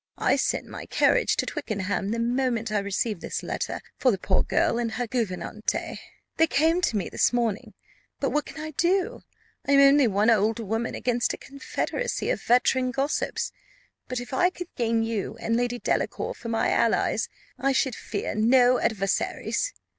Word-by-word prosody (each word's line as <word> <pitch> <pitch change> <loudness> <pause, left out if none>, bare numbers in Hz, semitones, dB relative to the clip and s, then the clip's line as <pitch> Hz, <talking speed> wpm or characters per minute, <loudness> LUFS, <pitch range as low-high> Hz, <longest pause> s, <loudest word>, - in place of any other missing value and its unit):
I - - +3
sent - - 0
my - - -9
carriage - - +3
to - - 0
Twickenham, 205 - -2
the 230 - -1
moment 235 -1 0
I 210 - +2
received 200 0 -2
this - - -4
letter, - - -3 0.2
for 260 - +4
the 205 - +2
poor 190 0 +1
girl 235 - +1
and 230 -2 -2
her 245 +2 -2
gouvernante. 215 -3 -3 0.4
They 325 - +5
came 325 +4 +2
to 235 -11 +1
me 195 - -2
this - - +2
morning; 235 -4 -1 0.4
but - - 0
what 300 0 0
can - - -9
I 310 0 -5
do? 355 +5 +1 0.5
I 280 - +3
am 275 - +7
only 275 -1 +6
one 210 +2 +3
old 220 +1 +2
woman 225 +1 -2
against 240 -1 0
a - - -15
confederacy 485 - -3
of - - -2
veteran 255 +1 +3
gossips; 275 +4 -1 0.6
but 255 - -3
if 245 +2 -8
I 355 +7 +4
could 355 -1 -9
gain 230 -1 +1
you 225 -3 -3
and 230 - 0
Lady 245 0 0
Delacour - - -1
for 230 - -8
my 225 -1 +1
allies, - - +1 0.3
I 275 - +2
should 265 -1 +1
fear 205 -2 -4
no 245 +3 +4
adversaries. 215 - -1
240 Hz, 175 wpm, -26 LUFS, 220-275 Hz, 0.6 s, am